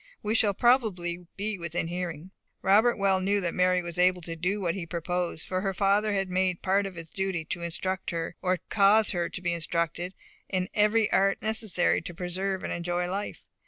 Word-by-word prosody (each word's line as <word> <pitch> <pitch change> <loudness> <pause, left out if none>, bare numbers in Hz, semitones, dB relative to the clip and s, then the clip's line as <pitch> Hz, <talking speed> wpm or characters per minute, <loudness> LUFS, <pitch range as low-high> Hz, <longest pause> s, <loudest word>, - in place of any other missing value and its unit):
We 210 - 0
shall 210 -3 +2
probably 180 -9 +1
be 205 0 -3
within 170 0 -2
hearing." 175 0 -5 0.3
Robert 215 +5 +4
well 195 -2 +2
knew 200 +2 +2
that 170 -2 -1
Mary 180 0 +2
was 170 0 -5
able 180 0 +3
to 165 0 -4
do 180 +5 -1
what 175 -4 0
he 180 -4 -5
proposed, 175 -1 -2
for 185 0 -1
her 195 -1 -2
father 205 +3 +2
had 195 -1 0
made 185 0 +1
it - - -26
a - - -17
part 195 +1 +2
of 190 - -9
his 165 -1 -9
duty 190 -4 -2
to 175 +2 -4
instruct 185 +3 -2
her, 165 -1 -3
or 185 0 +1
cause 210 +1 +4
her 175 -3 -1
to - - -6
be 175 -1 +1
instructed, 170 +2 -2 0.3
in 185 -1 -1
every 210 +1 +3
art 195 0 +3
necessary 215 -4 +2
to 170 +1 -8
preserve 185 +2 -2
and - - -2
enjoy 175 +1 -1
life. 200 +2 -4
185 Hz, 205 wpm, -28 LUFS, 175-195 Hz, 0.3 s, Robert